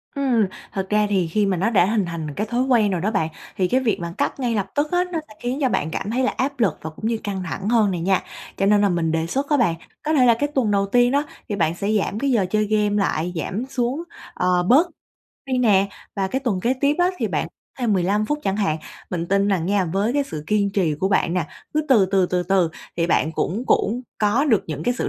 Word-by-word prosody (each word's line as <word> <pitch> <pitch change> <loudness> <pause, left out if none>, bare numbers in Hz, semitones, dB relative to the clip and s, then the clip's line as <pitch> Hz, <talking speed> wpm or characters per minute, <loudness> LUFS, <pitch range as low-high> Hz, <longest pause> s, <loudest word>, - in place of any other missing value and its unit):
Ừm. 255 -6 +2 0.3
Thật 190 -1 -2
ra 210 0 +2
thì 185 -4 +1
khi 205 +6 +1
mà 195 -2 0
nó 195 +6 +1
đã 190 -6 +4
hình 210 -1 +1
thành 165 -3 -5
cái 210 +7 -3
thói 245 +2 0
quen 235 -6 +3
rồi 180 -3 -1
đó 210 +4 0
bạn, 175 -7 0 0.3
thì 185 - +2
cái 255 +7 +2
việc 230 -8 0
bạn 170 0 -5
cắt - - -2
ngay 240 -3 0
lập 200 -2 -1
tức 295 +1 0
á, 355 0 +3
nó 330 - -1
sẽ - - -14
khiến 245 +2 -2
cho 260 - +3
bạn 160 -8 -1
cảm 205 - -3
thấy 255 +2 0
là - - +2
áp 275 0 -1
lực 195 -9 +2
và 160 - -5
cũng 160 +8 -5
như 230 0 0
căng 195 -3 -3
thẳng 190 +4 -4
hơn 220 -4 +3
này 175 -2 -3
nha. 190 +2 +2 0.4
Cho 195 - +1
nên 205 0 +4
là 205 - +3
mình 170 -3 0
đề 165 0 0
xuất 275 - -2
á 295 - +3
bạn, 215 -10 +2 0.3
có 310 - 0
thể 265 -5 +5
là 235 - +6
cái 290 +6 -1
tuần 235 -6 +2
đầu 200 0 +2
tiên 245 +4 +3
đó, 285 +1 +2 0.3
thì 205 - -1
bạn 165 -4 +1
sẽ 200 +3 -3
giảm 200 +2 -2
cái 275 +2 +1
giờ 220 -6 +2
chơi 215 +1 +1
game 210 -1 +1
lại, 180 -4 0
giảm 195 +7 -3
xuống, 260 +4 -1 0.3
ờ, 180 -1 +1
bớt 275 - +5 0.6
đi 260 -1 0
nè. 200 -5 +4 0.3
Và 195 -1 0
cái 260 +6 -2
tuần 225 -9 -1
kế 250 +5 +1
tiếp 285 +1 +3
á 355 +1 +3
thì - - -1
bạn - - -1 0.3
thêm 240 -4 +1
15 200 +3 +1
phút 295 +4 -1
chẳng 195 0 0
hạn. 195 -7 0 0.3
Mình 170 -2 -2
tin 200 +2 +2
rằng 180 -4 0
nha, 200 -1 +2
với 195 +7 0
cái 285 0 +2
sự 155 - -7
kiên 205 -1 +1
trì 185 -6 +1
của 185 +6 -1
bạn 180 -3 +1
nè, 170 -4 0 0.3
cứ 305 - +3
từ 220 -8 +5
từ, 190 -1 +2
từ 180 0 0
từ 180 -1 +2 0.3
thì 170 - +1
bạn 160 -2 +1
cũng 200 +9 -2
cũng 240 +4 +1 0.2
có 215 +7 +2
được 230 -9 +3
những 155 -2 -5
cái 245 - +1
sự - - -1
205 Hz, 270 wpm, -22 LUFS, 180-245 Hz, 0.6 s, là